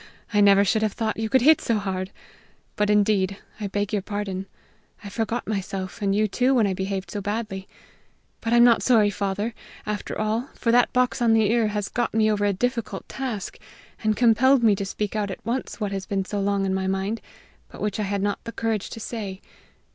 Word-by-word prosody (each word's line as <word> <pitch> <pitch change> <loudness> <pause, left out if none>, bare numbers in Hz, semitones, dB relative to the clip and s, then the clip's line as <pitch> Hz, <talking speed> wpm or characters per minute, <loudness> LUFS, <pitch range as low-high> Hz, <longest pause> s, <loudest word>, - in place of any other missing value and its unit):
"I 205 - +4
never 200 0 +6
should 215 +3 +2
have 215 -2 0
thought 225 -1 -2
you 220 0 -1
could 260 0 +3
hit 310 +2 +6
so 230 - +1
hard. 190 -2 -3 0.7
But, 210 0 +1
indeed, 200 -2 +2 0.2
I 210 - -2
beg 205 +1 -2
your 205 - +1
pardon. 195 -1 -4 0.6
I 205 - -7
forgot 225 +3 -2
myself 195 -2 -4
and 200 -1 +1
you 215 +1 +3
too 255 +6 +2
when 230 -4 +4
I 195 - 0
behaved 190 -1 -3
so 205 - -3
badly. 205 -2 -4 0.7
But 225 - -3
I'm 240 0 +6
not 240 -1 +6
sorry, 220 -5 +4
father, 205 +3 -2 0.3
after 210 -1 -4
all, 220 +5 -1
for 230 - 0
that 245 +1 +4
box 250 -1 +1
on 230 -2 +4
the 220 -2 +3
ear 230 -2 +3
has 205 -1 -2
got 240 -2 -2
me 215 -1 +4
over 205 -1 +1
a 205 - +3
difficult 230 -1 -2
task, 245 -7 -5 0.4
and 215 -1 +1
compelled 245 +2 +4
me 220 -2 +6
to 200 - -2
speak 210 +2 -3
out 210 -2 -1
at 190 - -8
once 240 +2 -3
what 205 -2 -2
has 195 -1 -4
been 195 -2 -1
long 200 -1 +1
in 190 - 0
my 190 0 -1
mind, 195 +4 -1 0.5
but - - -12
which 210 +1 -2
I 205 -2 -1
had 200 -1 -1
not 205 0 -1
the 230 - -6
courage 225 -3 -2
to - - -8
say. 205 -4 -5
210 Hz, 215 wpm, -24 LUFS, 195-225 Hz, 0.7 s, never